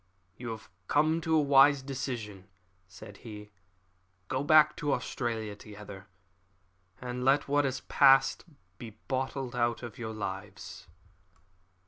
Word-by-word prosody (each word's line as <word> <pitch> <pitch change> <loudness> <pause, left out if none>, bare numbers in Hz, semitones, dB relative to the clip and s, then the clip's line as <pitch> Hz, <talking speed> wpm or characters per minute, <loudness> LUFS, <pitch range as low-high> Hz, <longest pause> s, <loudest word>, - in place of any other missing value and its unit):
"You 120 -1 -7
have 110 -1 -7 0.2
come 155 +3 +2
to 160 -1 +1
a - - +5
wise 140 -1 +5
decision," 120 -8 -6 0.4
said 95 +2 -13
he. 105 -2 -11 0.8
"Go 130 +1 -1
back 155 0 +5
to 150 -5 0
Australia 115 -4 -3
together, 105 -1 -11 0.9
and 125 0 -5
let 135 +2 +3
what 145 +1 +2
has 130 -1 -2
passed 135 -1 +4 0.4
be 115 -3 -10
blotted 130 -1 -3
out 120 0 0
of 120 +2 -8
your 110 -2 -5
lives." 100 -1 -7
125 Hz, 125 wpm, -29 LUFS, 110-140 Hz, 0.9 s, a